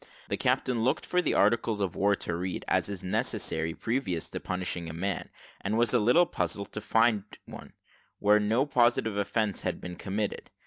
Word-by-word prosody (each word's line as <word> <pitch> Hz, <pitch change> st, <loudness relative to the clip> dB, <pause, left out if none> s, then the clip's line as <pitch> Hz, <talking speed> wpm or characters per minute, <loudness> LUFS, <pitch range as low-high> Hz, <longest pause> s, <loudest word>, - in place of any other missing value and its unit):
The -, -, 0 dB
captain 120 Hz, -3 st, +1 dB
looked 125 Hz, -, +1 dB
for 180 Hz, -, +1 dB
the -, -, 0 dB
articles 110 Hz, 0 st, +2 dB
of 95 Hz, -4 st, -1 dB
war 100 Hz, +1 st, +3 dB
to 85 Hz, -, -4 dB
read, 90 Hz, +1 st, -4 dB
as -, -, +1 dB
is 100 Hz, -3 st, -5 dB
necessary 80 Hz, -3 st, -1 dB
previous 105 Hz, -9 st, -2 dB
to -, -, -4 dB
punishing 90 Hz, -2 st, -4 dB
a -, -, -6 dB
man, 95 Hz, +2 st, -3 dB, 0.3 s
and 105 Hz, +3 st, 0 dB
was 120 Hz, 0 st, +4 dB
a 125 Hz, -, +5 dB
little 125 Hz, +11 st, +5 dB
puzzled 100 Hz, -, -2 dB
to 105 Hz, -, -5 dB
find 110 Hz, -1 st, +2 dB, 0.2 s
one, -, -, -11 dB, 0.4 s
where 105 Hz, +1 st, +4 dB
no 110 Hz, +6 st, +2 dB
positive 120 Hz, -5 st, +2 dB
offence 100 Hz, 0 st, 0 dB
had -, -, -2 dB
been 90 Hz, -1 st, -7 dB
committed. 100 Hz, +2 st, -3 dB
105 Hz, 185 wpm, -29 LUFS, 95-115 Hz, 0.4 s, a